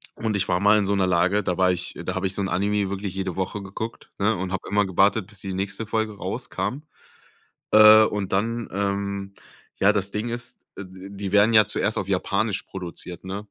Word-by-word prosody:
und 110 -2 -2
ich 95 - 0
war 90 - +1
mal 105 +2 +5
in 105 - +1
so 100 - +1
'ner 95 -2 +2
Lage, 90 +4 +2
da 90 -1 -1
war 95 -1 +4
ich 90 0 -3
da - - -2
habe 95 +1 0
ich 95 - -3
so - - -2
'n 95 - -1
Anime 100 0 0
wirklich 100 -1 -4
jede 95 -2 -3
Woche 95 +2 -3
geguckt, 100 +4 -7
ne, 110 +2 +2
und 95 0 -4
habe 95 - -4
immer 105 0 +2
gewartet, 95 +2 +2
bis 100 -1 -9
die 95 0 -5
nächste 100 +3 -3
Folge 110 0 -1
rauskam, 125 +7 -4 0.9
äh, 110 0 +9
und 105 -3 -3
dann, 115 +4 -1
ähm 100 0 -2 0.5
ja, 100 +2 +5
das 100 -2 -1
Ding 105 +3 -3
ist, 120 +1 -5 0.2
äh, 100 - -6
d 95 +1 -11
die 100 -1 -5
werden 105 +2 +5
ja 110 -1 +8
zuerst - - -1
auf - - -3
Japanisch 100 0 0
produziert, 90 -1 -7
ne? 100 +3 -6
100 Hz, 220 wpm, -24 LUFS, 95-105 Hz, 0.9 s, äh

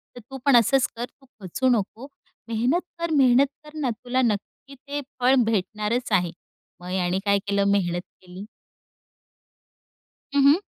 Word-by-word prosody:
तर - - -8
तू 270 - -5
पण 275 -3 +5
असंच 260 +3 +3
कर, 240 +1 -3
तू 270 +2 -26 0.2
खचू 255 +8 0
नको, 225 +6 -5 0.4
मेहनत 245 +10 +1 0.2
कर, 335 -1 -2
मेहनत 260 0 +5 0.2
कर 300 +1 -14
ना, 265 -4 0
तुला 245 +3 -2
नक्की 235 +5 -3
ते 285 +2 -6 0.2
फळ 255 +2 +4
भेटणारच 215 +3 -1
आहे." 175 -2 +2 0.5
मग 180 +1 -7
याने 185 0 0
काय 200 0 +3
केलं 200 0 +2
मेहनत 175 -3 0 0.2
केली. 185 +3 -10 1.9
हं, 280 - +5
हं. 305 +6 +6
235 Hz, 150 wpm, -24 LUFS, 200-270 Hz, 1.9 s, हं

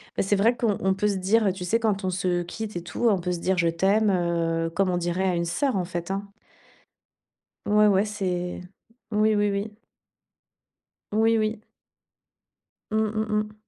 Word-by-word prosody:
Bah, - - +1
c'est 200 +1 +1
vrai 225 +5 +3
qu'on 225 -4 0
on 190 0 +2
peut 210 +2 0
se 200 - 0
dire, 195 +2 +2
tu 185 -1 -7
sais, 225 +6 +1
quand 210 -4 0
on 185 - 0
se 180 -1 0
quitte, 215 +4 -6
et 175 - -4
tout, 205 +7 -1
on 200 - +3
peut 180 +1 -2
se 175 - -2
dire 190 +2 0
«je 170 -1 +2
t'aime», 200 +5 +2
heu, 170 -2 0
comme 185 +3 0
on 180 - 0
dirait 175 +2 -1
à 180 - +1
une 170 0 -1
sœur, 270 - 0
en 185 -2 0
fait, 175 0 -5
hein. 200 +1 -3 1.4
Ouais, 210 0 +4
ouais, 195 0 +4
c'est 180 -4 -3 0.5
oui, 215 0 +3
oui, 205 0 +2
oui. 205 +2 -3 1.4
Oui, 225 +2 +3
oui. 215 0 -1 1.3
Mmh, 215 - +1 0.2
mmh, 220 - 0
mmh. 210 0 -5
195 Hz, 190 wpm, -25 LUFS, 175-210 Hz, 1.4 s, Ouais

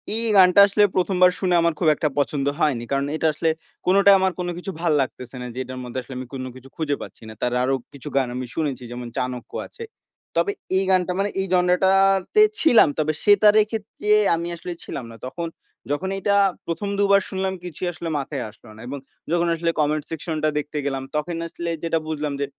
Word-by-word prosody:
এই 230 - -1
গানটা 185 +1 +7
আসলে 205 +1 +3
১ম 185 +1 +1
বার 180 0 +7
শুনে 180 -2 +2
আমার 170 -1 +2
খুব 170 - +1
একটা 150 - 0
পছন্দ 140 -1 0
হয়নি। 135 -8 +1
কারণ 140 0 +1
এটা 160 - +1
আসলে 160 +2 0 0.4
কোনটাই 200 +2 +6
আমার 190 0 +2
কোন 175 - -2
কিছু 190 +2 -5
ভাল 170 -2 +2
লাগতেছে 130 -1 -5
না 125 - -5
যে 130 - -6
এটার 130 0 -8
মধ্যে 125 +1 -5
আসলে 130 +2 -11
আমি 130 0 -6
কোন 130 -1 -4
কিছু 130 +1 -13
খুঁজে 150 -3 -1
পাচ্ছি - - -10
না। - - -8
তার 125 0 0
আরো 135 - +1 0.2
কিছু 140 +1 -10
গান 135 -2 +2
আমি 125 0 -3
শুনেছি 140 -6 -2
যেমন 120 0 -6
"চাণক্য" 125 -1 -4 0.2
আছে। 460 - -10 0.5
তবে 405 - +2 0.3
এই 195 - +2
গানটা 185 -1 +2
মানে 200 - +1
এই 190 - -1
জনরাটাতে 190 - +3 0.2
ছিলাম। 235 - +6
তবে 155 0 +1
সেতার 205 +1 +6
এর - - +1
ক্ষেত্রে 215 -1 -5 0.3
আমি 170 +1 -4
আসলে 175 +1 -7
ছিলাম 130 - -6
না। - - -11
তখন 170 +6 -4 0.4
যখন 175 +6 -1
এটা 200 +1 +1 0.3
১ম 185 +5 -3
দুবার 200 0 +5
শুনলাম 190 0 -2
কিছুই 180 +1 -5
আসলে 170 0 -5
মাথায় 140 -2 -4
আসলো 110 +1 -18
না - - -15
এবং 140 +3 -5 0.3
যখন 170 0 +2
আসলে 170 +1 -1
কমেন্ট 150 0 +1
সেকশন 160 0 -4
টা 155 - +4
দেখতে 150 +1 -3
গেলাম 135 -1 -2
তখন 165 +3 -2
আসলে 170 +1 -5
যেটা 165 -1 +1
বুঝলাম 150 -2 -2
যে - - +1
165 Hz, 210 wpm, -23 LUFS, 140-190 Hz, 0.5 s, গানটা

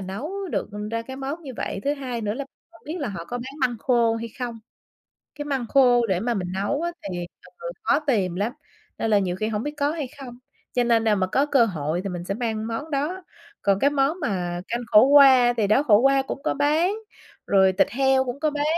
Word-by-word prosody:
nấu 200 - -5 0.2
được - - -2 0.2
ra 230 0 -2
cái 265 +3 -8
món 275 +5 -5
như 275 -4 -7
vậy. 195 - -4
Thứ 285 +1 +1
hai 255 -4 -5
nữa 210 0 -2
là 280 +1 -4 0.3
không 335 - -19
biết 315 +4 -5
là 280 - -2
họ 175 -4 -6
có 245 +7 -5
bán 265 +4 -8
măng 245 -3 0
khô 235 -2 +2
hay 230 +1 -5
không, 240 -3 -4 0.8
cái 290 - -6
măng 270 -4 -2
khô 245 -3 +4
để 190 -3 0
mà 240 +1 -1
mình 180 -3 -3
nấu 205 - -1
á, 345 - -1 0.2
thì 175 -1 -4 0.3
ừ, - - -6
khó 290 - +3
tìm 195 -9 +1
lắm, 205 +5 -1 0.5
nên 225 - -1
là 205 - +5
nhiều 180 -2 -1
khi 215 +3 -2
hổng 215 0 -2
biết 295 0 -4
có 285 0 +1
hay 305 -6 -4
không. 245 -3 -9 0.4
Cho 245 -1 +2
nên 230 -1 +3
nào 215 -2 +3
mà 190 -1 +1
có 270 +10 +1
cơ 270 -5 +4
hội 160 -5 -2
thì 195 - -2
mình 175 -1 -5
sẽ 195 - -3
mang 220 -2 -3
món 230 +8 -5
đó. 310 +7 -2 0.4
Còn 200 -1 +2
cái 280 +7 +3
món 290 +5 0
mà 175 -4 -2
canh 235 +1 -2
khổ 215 -1 +7
qua, 270 -4 +7
thì 215 - +2
đó, 215 +8 +3
khổ 215 -8 +5
qua 270 +2 +4
cũng 275 - -6
có - - 0
bán, 310 +7 +2 0.5
rồi 190 -1 +4
thịt 185 - +2
heo 265 +1 +2
cũng 250 +2 -5
có 310 0 +1
bán, 290 0 -2
245 Hz, 245 wpm, -24 LUFS, 205-280 Hz, 0.8 s, khổ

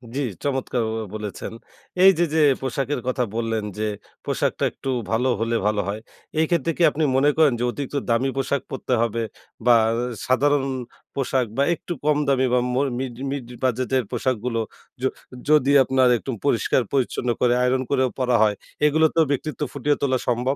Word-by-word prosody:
জি, - - -1 0.2
চমৎকার 130 -3 -1
ব - - -3 0.2
বলেছেন। 105 +1 -6 0.5
এইযে 190 -3 +6
যে - - +3 0.2
পোশাকের 135 +1 -2
কথা 125 0 +1
বললেন। 115 -2 -1
যে 110 - -2 0.4
পোশাকটা - - -1
একটু 135 - -7 0.2
ভালো 120 +3 +1
হলে 115 +1 0
ভালো 105 -1 +1
হয়। 105 +2 -3 0.4
এই 160 - +4
ক্ষেত্রে 170 -1 +1
কি 175 - +2
আপনি 155 +2 -1
মনে 140 +2 +4
করেন 155 -5 +5
যে 120 - -1
অতিরিক্ত 145 +1 -6
দামি 120 +3 +2
পোশাক 135 +1 0
পরতে 130 -1 -2
হবে? 115 0 0 0.4
বা 120 -1 +7 0.5
সাধারণ 140 +2 +3 0.5
পোশাক 130 -2 0
বা 140 - +4
একটু 175 - -5
কম 150 -1 +3
দামি 130 -1 +3
বা 125 - +4
মর 140 +2 +1
মিড 130 -3 -4 0.2
মিড 140 -4 -4 0.2
বাজেটের 130 +1 +1
পোশাকগুলো? 125 -2 -1 0.4
য - - -8 0.5
যদি 145 -3 +5
আপনার 130 -1 +3
একটু 130 - -5
পরিষ্কার 130 0 +2
পরিচ্ছন্ন 125 -2 0
করে 120 -1 +4
আয়রন 130 +1 +2
করেও 130 -2 +2
পরা 125 -1 +2
হয়। 105 -1 +2 0.3
এগুলোতেও 160 +2 +4
ব্যক্তিত্ব 150 +3 -3
ফুটিয়ে 145 +1 0
তোলা 130 -2 +2
সম্ভব? 125 +3 +1
130 Hz, 165 wpm, -23 LUFS, 120-140 Hz, 0.5 s, বা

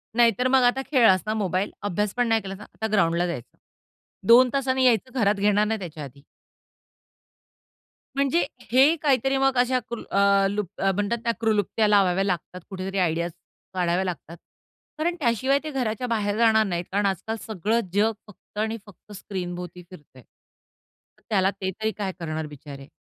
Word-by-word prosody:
नाहीतर 240 +1 +3
मग 260 0 +4
आता 245 +2 +3
खेळलास 225 -9 +5
ना 215 - -1
मोबाईल, 195 -2 -1
अभ्यास 205 +1 -1
पण 245 -1 +2
नाही 225 -1 +2
केलास 195 -1 -7
ना. 210 - -11
आता 220 - -3
ग्राउंडला 175 -4 +2
जायचं. 125 -9 -7 0.7
2 250 +2 +7
तासांनी 260 -1 +1
यायचं, 255 +2 +2
घरात 205 -2 +3
घेणार 205 +1 +2
नाही 220 +1 -1
त्याच्या 160 -5 -7
आधी. 140 0 -12 1.9
म्हणजे 280 +5 +2 0.3
हे 270 +6 +5
काहीतरी 270 -2 +2
मग 270 -1 +2
अशा 250 +1 +2
कुल 235 - -5
अ, 200 0 +4
लु 205 +1 -1 0.2
अ, 195 0 +2
म्हणतात 205 +4 -1
ना, 235 - +3
क्लृप्त्या 215 -1 +1
लावाव्या 195 -2 +3
लागतात 180 -1 -3
कुठेतरी, 190 0 -5
आयडियाज 170 -1 0 0.4
काढाव्या 180 0 0
लागतात. 170 -1 -6 0.6
कारण 340 +3 0
त्याशिवाय 260 +1 +1
ते 310 - -5
घराच्या 250 -3 -2
बाहेर 210 -3 -1
जाणार 220 -1 +4
नाहीत. 175 -3 -3
कारण 200 +2 +1
आजकाल 195 +3 -2
सगळं 220 +2 0
जग 210 +3 +3 0.2
फक्त 210 0 -19
आणि 220 +1 -1
फक्त 205 +1 -18
स्क्रीनभोवती 180 -3 -6
फिरतय. 145 -7 -15
तर - - -38
त्याला 195 -2 +2
ते 190 -1 -4
तरी 220 0 +1
काय 200 -3 -4
करणार 160 -2 -4
बिचारे! 140 -1 -11
205 Hz, 165 wpm, -24 LUFS, 185-235 Hz, 1.9 s, 2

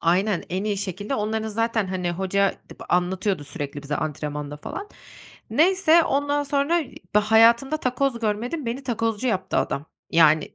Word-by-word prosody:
Aynen, 185 +3 +1
en 185 +3 -2
iyi 210 -1 0
şekilde 205 +4 -3
onların 220 -1 -1
zaten, 225 -1 0
hani, 185 -1 -2
hoca 190 +2 +1 0.2
b - - -11
anlatıyordu 180 -1 0
sürekli 145 0 -6
bize 150 +1 -2
antrenmanda 150 -1 -4
falan. 400 - -7 0.6
Neyse 340 0 +4
ondan 285 +1 +1
sonra 280 0 0
da, - - +4 0.4
ııı, 210 - +4
hayatımda 230 +6 +5
takoz 260 -2 -1
görmedim, 235 +7 -2
beni 240 +4 -3
takozcu 230 -2 -1
yaptı 190 -5 -1
adam. 140 +3 -1 0.2
Yani, 155 -2 +4
210 Hz, 155 wpm, -24 LUFS, 180-255 Hz, 0.6 s, hayatımda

